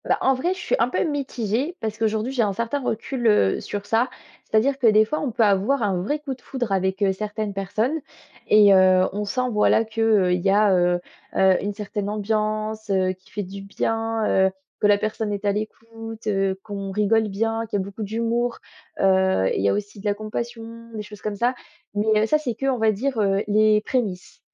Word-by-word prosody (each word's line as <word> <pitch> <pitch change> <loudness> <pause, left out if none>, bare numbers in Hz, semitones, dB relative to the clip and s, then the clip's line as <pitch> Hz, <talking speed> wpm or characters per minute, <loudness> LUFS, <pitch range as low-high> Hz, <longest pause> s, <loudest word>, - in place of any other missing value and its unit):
Ben, - - +2
en 265 - +4
vrai, 305 +8 0
je - - -10
suis - - 0
un 230 - +3
peu - - 0
mitigée 275 - -2
parce 215 -1 -4
qu'aujourd'hui, 220 +2 0
j'ai 250 - +1
un 205 -3 +1
certain 235 +7 -2
recul, 240 +1 -2
heu, 155 - +3
sur 205 0 -5
ça, 230 +4 +1 0.4
c'est-à-dire 265 +5 +1
que, 245 - +4
des 215 0 +6
fois, 305 +8 -2
on 285 - -1
peut 225 - +2
avoir 210 +6 +2
un 190 -4 0
vrai 290 +11 -1
coup 280 -2 -5
de 260 - -14
foudre 245 -6 -4
avec, 190 +1 0
heu, 195 -1 +3
certaines 210 +1 -4
personnes 215 +10 -1 0.5
et 205 -2 +7
heu, 185 -1 +5
on 205 +1 -2
sent, 255 +5 -1
voilà, 215 +1 +3
qu'il 220 -4 +2
y 195 - +1
a, 205 0 +4
heu 175 0 +2 0.4
heu, 190 -1 +5
une 205 +1 -2
certaine 205 -1 -4
ambiance, 215 +1 -2
heu, 190 -1 +2
qui 185 - -24
fait 210 - -3
du 195 +1 -8
bien, 225 +2 -2 0.2
heu, - - -2 0.3
que 205 - +3
la 205 0 +5
personne 215 0 -2
est 205 0 -4
à 200 - +3
l'écoute, 225 +1 -7
heu, 195 -2 0
qu'on 200 -2 -5
rigole 210 +2 +2
bien, 225 +3 -1
qu'il 210 - -1
y - - 0
a - - -8
beaucoup 200 +2 -9
d'humour, 230 +3 -1 0.4
heu 190 - +3
et - - -1
il - - 0
y 100 - +4
a - - +2
aussi 205 0 -4
de 200 - -12
la 205 -1 +1
compassion, 230 +2 -6
des 210 - -4
choses 210 0 -12
comme 210 -1 -3
ça, 240 +5 +1 0.4
mais 215 +1 +2
heu, - - +3
ça 305 +7 +2
c'est 245 -6 -3
que, 270 - -4
on 265 -3 +1
va 220 0 +4
dire, 240 +4 -2
heu, 195 0 +1
les 215 0 +4
prémices 210 -7 -3
215 Hz, 225 wpm, -23 LUFS, 200-230 Hz, 0.5 s, et